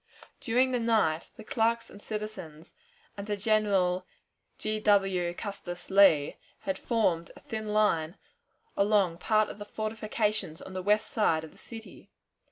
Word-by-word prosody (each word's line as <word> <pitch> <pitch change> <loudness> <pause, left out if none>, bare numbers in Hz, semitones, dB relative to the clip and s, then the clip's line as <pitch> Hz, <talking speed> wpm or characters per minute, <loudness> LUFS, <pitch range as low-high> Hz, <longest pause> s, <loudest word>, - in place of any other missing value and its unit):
During 255 +2 +2
the 250 - +1
night 215 -9 +1
the 220 - -10
clerks 230 +1 +1
and 205 - -13
citizens, 210 -8 -7 0.5
under 205 +1 -2
General 195 -4 +1 0.5
G. 215 0 -2
W. 195 -4 +2
Custis 190 -4 -6
Lee, 190 -7 +5 0.2
had 190 -1 -3
formed 180 -8 +1
a - - -13
thin 220 -6 -5
line 200 -5 +2 0.6
along 200 -4 +2
part 215 +2 +2
of - - -9
the 205 - -6
fortifications 215 -5 -2
on 190 - -10
the 185 - -3
west 210 +3 +2
side 160 -7 +2
of 160 - -10
the - - -21
city. 225 -1 -11
205 Hz, 145 wpm, -29 LUFS, 180-215 Hz, 0.6 s, Lee